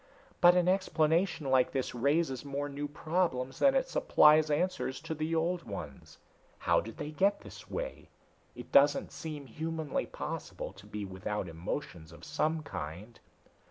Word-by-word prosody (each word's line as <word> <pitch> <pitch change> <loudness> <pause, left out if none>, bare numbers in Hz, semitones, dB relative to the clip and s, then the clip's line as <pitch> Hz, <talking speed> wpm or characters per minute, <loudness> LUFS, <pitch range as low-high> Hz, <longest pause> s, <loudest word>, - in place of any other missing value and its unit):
But 175 0 +8
an 180 -1 +3
explanation 165 -4 +1
like 130 -1 +3
this 135 -2 -1
raises 140 +1 +1
more 140 0 -3
new 145 +1 -4
problems 145 -4 -1
than 275 -1 +5
it 265 -1 +2
supplies 155 0 +5
answers 165 -3 0
to 160 +1 -4
the 155 +1 -2
old 170 +2 0
ones. 85 - -8 0.4
How - - +2
did 115 0 -9
they 150 - -5
get 195 +6 +2
this - - -12
way! - - -5 0.5
It - - -10
doesn't 145 +1 +5
seem 150 -3 -6
humanly 160 +2 -3
possible - - -6
to - - -15
be 105 -1 -5
without 95 +1 -4
emotions 85 - -5
of 85 - -12
some 155 +1 0
kind." 90 - -7
150 Hz, 155 wpm, -31 LUFS, 125-165 Hz, 0.5 s, But